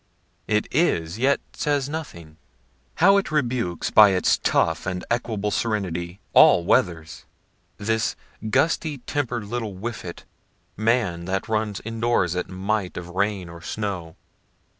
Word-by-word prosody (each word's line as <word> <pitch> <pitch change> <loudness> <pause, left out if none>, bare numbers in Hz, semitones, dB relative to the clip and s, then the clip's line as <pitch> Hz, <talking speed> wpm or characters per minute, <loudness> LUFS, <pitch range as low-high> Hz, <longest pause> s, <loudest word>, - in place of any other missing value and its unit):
It 105 -1 +1
is, 95 - +1
yet 135 +3 +2
says 145 -2 0
nothing. 85 - -7 0.6
How 195 +3 +5
it 200 - 0
rebukes 120 - -1
by 105 -1 +8
its 90 - +2
tough 80 +1 +1
and 90 -1 -3
equable 110 -3 -1
serenity 95 -6 -2
all 85 - +7
weathers, 80 -2 0 0.5
this 110 +1 0 0.3
gusty 155 +4 +1
temper'd 125 -6 -2
little 110 -2 -4
whiffet, 95 -4 -6 0.5
man, 110 -6 0
that 95 +3 -2
runs 110 -2 -1
indoors 115 -6 0
at 90 - -3
a - - -11
mite 95 +1 -2
of 90 0 -6
rain 100 0 -1
or 85 0 -11
snow. 90 -3 -4
105 Hz, 130 wpm, -24 LUFS, 90-120 Hz, 0.6 s, by